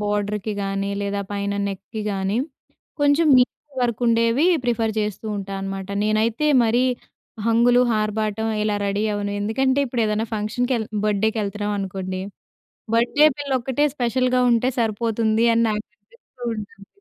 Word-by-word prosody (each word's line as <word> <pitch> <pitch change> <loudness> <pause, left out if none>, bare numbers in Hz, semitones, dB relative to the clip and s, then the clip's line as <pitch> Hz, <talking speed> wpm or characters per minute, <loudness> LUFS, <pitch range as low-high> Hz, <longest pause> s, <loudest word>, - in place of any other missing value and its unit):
బోర్డర్‌కి 210 0 -1
గానీ, 195 0 -2
లేదా 200 0 -2
పైన 200 0 -2 0.2
నెక్‌కి 200 +3 -6
గానీ, 195 +2 -1 0.6
కొంచం 290 +2 +4
నీట్ 250 - +3 0.3
వర్కుండేవి 235 +4 +2 0.2
ప్రిఫర్ 230 -2 0
చేస్తూ 210 +1 -4
ఉంటానమాట. 195 -1 -5 0.2
నేనైతే 220 +6 +1 0.2
మరీ 240 +3 +2 0.6
హంగులు, 240 +2 +4
ఆర్భాటం 215 0 -1 0.2
ఇలా 210 -1 0
రెడీ 200 +1 -1
అవ్వను. 205 0 -2
ఎందుకంటే, 260 +6 +1
ఇప్పుడేదన్నా 225 -3 0
ఫంక్షన్‌కెళ్ 220 +2 -1 0.2
బర్త్‌డే‌కెళ్తన్నావనుకోండి. 205 -3 -1 0.7
బర్త్‌డే‌ 265 +6 +4
పిల్లొక్కటే 270 0 0
స్పెషల్‌గా 255 0 +1
ఉంటే 235 +2 +2
సరిపోతుంది 225 0 +1
అని 230 - +3
నాకనిపిస్తూ 210 +3 -9
ఉంటుంది. 200 -1 -9
220 Hz, 110 wpm, -22 LUFS, 205-240 Hz, 0.7 s, కొంచం